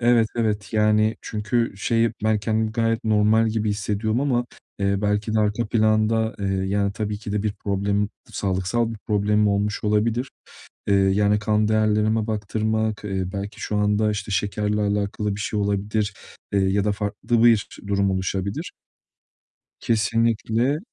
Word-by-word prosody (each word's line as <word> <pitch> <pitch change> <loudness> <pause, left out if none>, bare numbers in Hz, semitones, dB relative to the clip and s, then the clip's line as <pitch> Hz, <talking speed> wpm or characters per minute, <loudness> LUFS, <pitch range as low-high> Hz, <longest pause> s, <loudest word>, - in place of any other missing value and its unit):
Evet, 120 -2 +4
evet. 105 -3 -1
Yani 110 0 +3
çünkü 110 +1 -1
şey, 115 +2 +1
ben 110 -1 +3
kendimi 110 +1 -1
gayet 115 -1 0
normal 110 +1 +3
gibi 110 -1 -1
hissediyorum 105 +3 -1
ama, 125 -4 +1 0.3
eee, 100 0 +1
belki 105 +1 0
de - - +3
arka 105 +2 0
planda, 110 0 +2
eee, 100 - -2
yani 95 +1 0
tabii 105 0 -3
ki 105 -1 -6
de 105 -1 0
bir 105 -1 -1
problemim, 100 0 -1 0.2
sağlıksal 95 +4 -1
bir 110 - -8
problemim 105 0 +2
olmuş 105 +2 -1
olabilir. 110 +4 +1 0.6
Eee, 100 - +4
yani 100 +2 +3
kan 105 0 +1
değerlerime 110 0 +2
baktırmak 110 0 -1
eee, 95 -2 -2
belki 100 +2 -5
şu 105 - -2
anda, 105 +1 +2
işte, 105 +1 -4
şekerle 105 +2 0
alakalı 105 0 -1
bir - - -8
şey 105 +1 -2
olabilir, 100 +1 -1 0.4
eee, 100 - +3
ya 95 +1 +2
da 105 - +1
farklı 105 +3 -1
bir 115 -3 +5 0.2
durum 100 -1 +1
oluşabilir. 95 +1 -3 1.1
Kesinlikle. 115 +4 +1
105 Hz, 150 wpm, -23 LUFS, 100-110 Hz, 1.1 s, bir